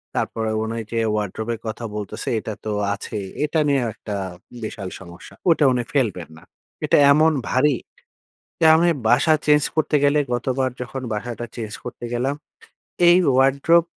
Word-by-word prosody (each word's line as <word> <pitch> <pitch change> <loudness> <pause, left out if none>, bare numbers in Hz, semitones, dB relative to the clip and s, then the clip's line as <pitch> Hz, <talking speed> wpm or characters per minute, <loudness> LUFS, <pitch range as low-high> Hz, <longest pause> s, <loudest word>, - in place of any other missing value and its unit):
তারপরে 110 -1 -1
উনি 115 +1 -4
যে 115 - -2 0.2
ওয়ারড্রোব 105 +1 -3
এর 110 - -6
কথা 110 +2 -5
বলতেছে 105 -2 -5
এটা 110 - -5
তো - - -2 0.2
আছেই। 100 0 -5 0.2
এটা 155 +1 0
নিয়েও 135 -4 +2
একটা 105 - -7 0.5
বিশাল 100 -3 -5
সমস্যা, 85 -1 -12 0.2
ওইটা 160 -2 +4
উনি 125 -1 0
ফেলবেন 105 - 0
না। - - -15 0.4
এটা - - +4
এমন 155 +2 +5 0.2
ভারী 135 +2 +3 0.9
যে 165 - +5
আমি 170 +2 +3 0.2
বাসা 140 +7 +4
চেঞ্জ 150 -1 +5
করতে 155 -1 +2
গেলে 145 +1 +4 0.2
গতবার 130 +2 -1
যখন 130 +2 -5
বাসাটা 120 +2 -4
চেঞ্জ 110 -2 -5
করতে 120 0 -8
গেলাম, 130 +4 0 0.8
এই 175 - +7 0.2
ওয়ারড্রোব 140 +6 +4
125 Hz, 155 wpm, -22 LUFS, 110-145 Hz, 0.9 s, এই